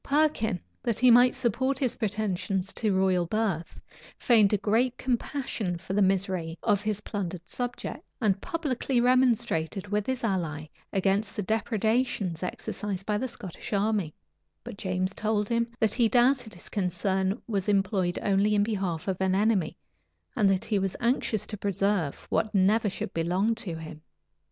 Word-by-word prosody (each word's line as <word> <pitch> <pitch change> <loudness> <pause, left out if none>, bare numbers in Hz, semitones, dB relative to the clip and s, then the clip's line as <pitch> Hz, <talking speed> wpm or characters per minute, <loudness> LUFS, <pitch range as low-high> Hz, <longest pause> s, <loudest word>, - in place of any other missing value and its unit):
Perkin, 280 -10 +1 0.2
that 235 -3 0
he 250 0 +6
might 245 +2 +6
support 260 +2 0
his 260 -4 0
pretensions 200 -3 -2
to 215 -3 0
royal 190 -2 +2
birth, 190 -5 -2 0.4
feigned 210 -4 +4
great 240 +4 +2
compassion 240 - -2
for 190 +2 -6
the 205 - +2
misery 185 -4 0
of 205 -3 +2
his 210 -1 -2
plundered 185 -4 -5
subjects, 245 +3 -4 0.2
and 205 -5 +1
publicly 275 -6 -1
remonstrated 235 -7 +2
with 210 0 -1
his 260 -2 -2
ally 165 -8 -1 0.3
against 195 +2 0
the 205 - -2
depredations 220 -4 0
exercised 195 +1 -4
by 210 -1 0
the 260 - -1
Scottish 210 -5 -7
army;[*] 200 -5 0 0.5
but - - -8
James 185 -1 -1
told 210 -1 0
him, 235 0 +1
that 220 -2 +2
he 235 -3 +3
doubted 245 -2 +3
his 175 - -12
concern 190 +1 0
was 205 -3 -1
employed 195 -3 +1
only 205 +1 +3
in 205 - +4
behalf 190 -6 -2
of 190 -1 -2
an 190 0 +2
enemy, 200 -5 +1 0.6
and 200 - +4
that 190 -1 +1
he 210 -3 +1
was 195 -1 -2
anxious 235 -3 0
to 210 - -6
preserve 195 -5 -1
what 215 - 0
never 205 +3 +3
should 195 - -5
belong 180 +7 +1
to 180 -6 -5
him. 160 -1 -9
205 Hz, 155 wpm, -27 LUFS, 190-230 Hz, 0.6 s, he